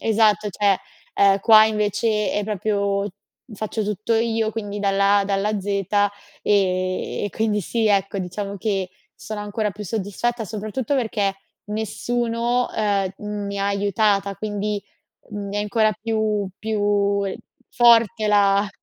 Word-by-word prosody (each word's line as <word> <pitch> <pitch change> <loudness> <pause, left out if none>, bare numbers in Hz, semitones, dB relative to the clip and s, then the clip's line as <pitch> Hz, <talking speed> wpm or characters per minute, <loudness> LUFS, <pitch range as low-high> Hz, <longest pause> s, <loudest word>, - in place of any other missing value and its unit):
Esatto, 215 -2 +3
cioè, 200 0 +2 0.4
ehm, 200 0 +4
qua 215 +1 +8
invece 210 0 0
è 205 - -1
proprio 200 -1 -1 0.4
faccio 215 +1 -3
tutto 210 +2 -1
io, 225 -1 +1
quindi 205 -2 -4
dalla 200 0 +3
A 200 - +1
dalla 205 +1 0
Z. 190 - -11 0.8
Ehm, 185 -2 0
e - - -1
quindi 215 +1 0
sì, 220 +4 0
ecco, 195 -1 +1
diciamo 195 +2 -4
che 195 -2 -1 0.3
sono 215 0 -6
ancora 210 +1 -2
più 210 - -8
soddisfatta, 225 +3 -2
soprattutto 215 +5 -3
perché 215 -6 0 0.4
nessuno, 235 +3 -1
ehm, 200 -3 0 0.3
mi 200 0 -4
ha 200 - 0
aiutata, 200 0 +1
quindi, 210 -1 -3 0.5
mi 205 -1 -5
è - - +1
ancora 215 +1 +2
più 215 -1 -1
più 205 -2 +1 0.5
forte, 235 -2 +4
ehm, - - +1
la 200 0 +3
210 Hz, 135 wpm, -22 LUFS, 200-220 Hz, 0.8 s, qua